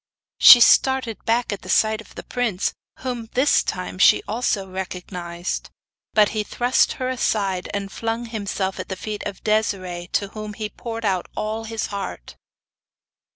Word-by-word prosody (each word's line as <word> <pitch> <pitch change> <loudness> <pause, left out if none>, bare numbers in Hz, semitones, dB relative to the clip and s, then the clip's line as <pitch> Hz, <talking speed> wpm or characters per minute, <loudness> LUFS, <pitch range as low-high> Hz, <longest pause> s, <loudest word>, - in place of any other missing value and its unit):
She 245 - +11
started 260 -2 +4
back 230 -1 +1
at 200 - -6
the 185 - -11
sight 220 +2 +3
of - - -17
the - - -7
prince, 230 -7 -1 0.3
whom 245 -3 -4
this 265 +4 +4
time 185 0 -4
she - - +6
also 210 -3 -1
recognised. 180 -2 -5 0.5
But 210 -2 +5
he 215 - -1
thrust 245 +4 +1
her 255 - -3
aside, 200 -7 -1
and 200 -1 -4
flung 230 +2 -3
himself 200 -4 -3
at - - -6
the 190 - -3
feet 210 +2 -5
of 200 -2 -8
Desiree, 185 -5 -1
to 200 - 0
whom 215 0 -7
he 215 0 -4
poured 230 -1 -6
out 185 -3 0
all 220 +1 -3
his 225 -1 -3
heart! 195 - -6
210 Hz, 160 wpm, -22 LUFS, 190-230 Hz, 0.5 s, She